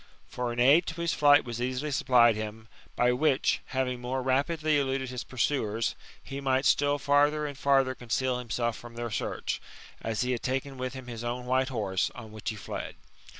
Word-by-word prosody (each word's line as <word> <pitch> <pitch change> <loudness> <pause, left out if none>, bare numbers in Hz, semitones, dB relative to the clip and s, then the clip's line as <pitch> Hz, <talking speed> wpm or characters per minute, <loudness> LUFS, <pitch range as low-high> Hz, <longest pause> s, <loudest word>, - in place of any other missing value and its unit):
For 125 -1 -3
an 120 - -4
aid 145 +8 +5
to 165 0 -4
his 170 -1 0
flight 145 -1 +5
was 120 -1 -5
easily 130 +4 -2
supplied 120 -4 +4
him, 110 +1 -6 0.3
by 125 0 +3
which, 135 +2 +2
having 130 -2 -2
more 130 +1 -2
rapidly 150 +3 +1
eluded 135 -2 -1
his 125 -1 -4
pursuers, 115 -4 -1 0.3
he 140 0 -6
might 135 0 +1
still 145 0 +3
farther 145 +1 +3
and 145 -1 -5
farther 135 -1 +3
conceal 125 +1 -1
himself 120 -1 -2
from 120 0 -11
their 120 -1 -4
search; - - -3 0.4
as 110 -1 -2
he 125 0 0
had 120 - -1
taken 135 +1 -3
with 130 0 -3
him 130 -1 -8
his 120 -2 -7
own 120 +1 -3
white 130 +1 +1
horse, 100 -7 0
on 110 -3 -9
which 110 -1 -5
he 110 - -4
fled. 105 - -6
130 Hz, 195 wpm, -28 LUFS, 120-140 Hz, 0.4 s, aid